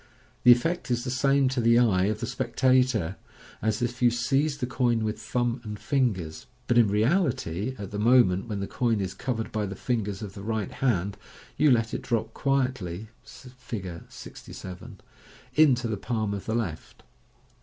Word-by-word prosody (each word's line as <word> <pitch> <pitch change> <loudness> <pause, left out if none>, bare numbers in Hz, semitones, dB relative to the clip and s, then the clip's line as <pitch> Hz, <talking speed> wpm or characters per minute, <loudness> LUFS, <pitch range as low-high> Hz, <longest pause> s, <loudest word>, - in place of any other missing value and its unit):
The 125 - +9
effect 165 +9 +2
is 120 -1 0
the 125 - -3
same 135 +1 +3
to 130 -1 -1
the 115 0 +5
eye 100 -7 +4
of 105 +1 -1
the - - -1
spectator 125 -5 +1 0.4
as 110 +3 0
if 120 +1 -3
you 120 - +6
seized 135 +5 0
the 125 - 0
coin 120 -2 +1
with 110 0 -3
thumb 120 +2 -1
and 105 -2 -6
fingers, 100 - -1 0.2
but, 120 -1 +3
in 115 - +5
reality, 110 - 0
at 100 -3 -7
the 105 - -4
moment 115 -4 +4
when 105 -3 -3
the - - -1
coin 115 0 0
is 95 -2 -3
covered 115 -3 -3
by 105 -1 -1
the 95 - -6
fingers 110 -3 -2
of 100 -2 -7
the 100 - -9
right 110 -1 -2
hand, 100 -6 0 0.4
you 150 - +4
let 115 -3 +2
it - - -2
drop 115 -2 -2
quietly 125 - -1
(see 125 - -13
Fig. 95 -9 -6
6j) 95 +6 -10 0.6
into 130 -6 +4
the 110 -2 -2
palm 110 -1 -2
of 100 - -6
the 110 - 0
left. 90 -10 -4
115 Hz, 180 wpm, -27 LUFS, 105-125 Hz, 0.6 s, The